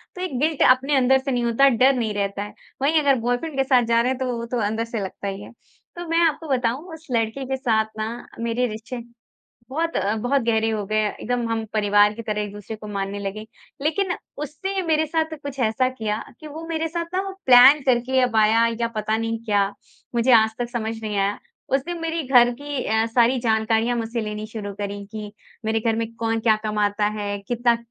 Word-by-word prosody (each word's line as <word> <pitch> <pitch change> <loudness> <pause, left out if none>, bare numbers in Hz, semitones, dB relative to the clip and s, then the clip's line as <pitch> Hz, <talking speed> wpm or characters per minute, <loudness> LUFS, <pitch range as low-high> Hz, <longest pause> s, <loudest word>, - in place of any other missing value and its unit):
तो 365 - -6
ये 370 - -1
गिल्ट 310 +1 0
अपने 265 +3 +3
अंदर 265 +1 +4
से 270 +1 -3
नहीं 245 -1 0
होता, 235 +4 +4
डर 260 +2 +4
नहीं 225 -4 -1
रहता 200 0 -2
है। 210 - -9 0.3
वहीं 305 +4 +3
अगर 280 -2 +4
बॉयफ्रेंड 245 +6 -2
के 270 - +3
साथ 260 -2 +4
जा 230 0 +3
रहे 250 +2 +1
हैं 260 - -2
तो 255 -2 -1
वो 235 - -4
तो 245 +1 -3
अंदर 220 +2 -2
से 230 -1 -4
लगता 190 +1 -6
ही 195 0 -4
है। - - -11 0.4
तो 345 0 -6
मैं 330 +1 +2
आपको 320 +1 -3
बताऊँ 260 +6 -1
उस 320 0 -12
लड़के 230 +3 -1
के 265 +1 -2
साथ 225 -5 +1
ना 220 +2 -3 0.2
मेरे 235 +2 0
रिश्ते 225 +3 -6 0.7
बहुत 330 +4 -1
अ, 200 +2 +1
बहुत 245 +5 +1
गहरे 225 -1 +1
हो 215 -2 -2
गए। 215 +2 +1
एकदम 240 +2 -3
हम 225 -1 -1
परिवार 205 -1 +4
की 230 - -7
तरह 210 -1 -2
एक 205 -1 -6
दूसरे 205 +2 -8
को 215 - -10
मानने 200 0 -3
लगे। 200 +2 -5 0.4
लेकिन 355 +5 0 0.3
उसने 380 +7 -3
मेरे 315 -2 +1
साथ 320 +1 -1
कुछ 280 -1 -7
ऐसा 240 +2 +2
किया 220 -4 -3 0.2
कि 310 - -10
वो 310 +2 -8
मेरे 325 -1 -1
साथ 335 +1 -3
ना 375 - +2 0.3
प्लान 260 +3 +8
करके 255 +1 +3
अब 250 -3 +1
आया 220 +1 +5 0.2
या 235 - +1
पता 215 0 0
नहीं 225 0 -2
क्या, 205 -3 +2 0.5
मुझे 240 +2 +3
आज 220 -1 +6
तक 240 -1 -2
समझ 225 -2 -3
नहीं 210 -1 -3
आया। 200 +1 0 0.4
उसने 330 +6 -4
मेरी 330 -1 -2
घर 245 -2 +6
की 285 -2 -4
अ, 220 +1 +2
सारी 240 +2 +3
जानकारियाँ 225 +1 +1
मुझसे 230 0 -2
लेनी 210 0 -4
शुरू 215 -2 -6
करी, 200 0 -5
कि 210 0 -8 0.3
मेरे 220 0 +1
घर 225 0 0
में 230 0 -3
कौन 225 0 -1
क्या 220 -1 +4
कमाता 210 -1 +1
है, 205 0 -3
कितना 240 0 +2
235 Hz, 215 wpm, -23 LUFS, 215-265 Hz, 0.7 s, प्लान